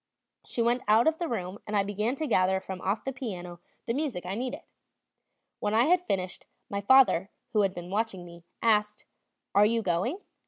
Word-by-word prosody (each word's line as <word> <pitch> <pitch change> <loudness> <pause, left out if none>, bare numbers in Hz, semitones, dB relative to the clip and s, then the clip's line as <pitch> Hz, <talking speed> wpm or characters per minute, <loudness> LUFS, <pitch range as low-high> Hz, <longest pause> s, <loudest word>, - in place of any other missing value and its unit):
She 235 - -2
went 240 +2 +2
out 220 +3 +5
of 320 0 +2
the 345 - -1
room 190 - -4
and 210 - -2
I 200 - +3
began 210 +5 -1
to 310 - -3
gather 190 -7 +2
from 190 -1 -7
off 200 +3 -1
the 270 - -3
piano 180 -9 -6 0.3
the 230 - -1
music 260 - -2
I 185 - -3
needed. 255 +8 -4 1.0
When 210 +1 0
I 230 - +5
had 360 +5 +2
finished, 185 -2 -3 0.2
my 200 0 -2
father, 205 -5 +5 0.2
who 215 - +4
had 195 -2 0
been 175 +1 -7
watching 205 -4 -2
me, 170 0 -13 0.2
asked: 210 -2 +2 0.5
"Are 200 - +6
you 230 0 0
going?" 190 - 0
210 Hz, 195 wpm, -28 LUFS, 185-245 Hz, 1.0 s, Are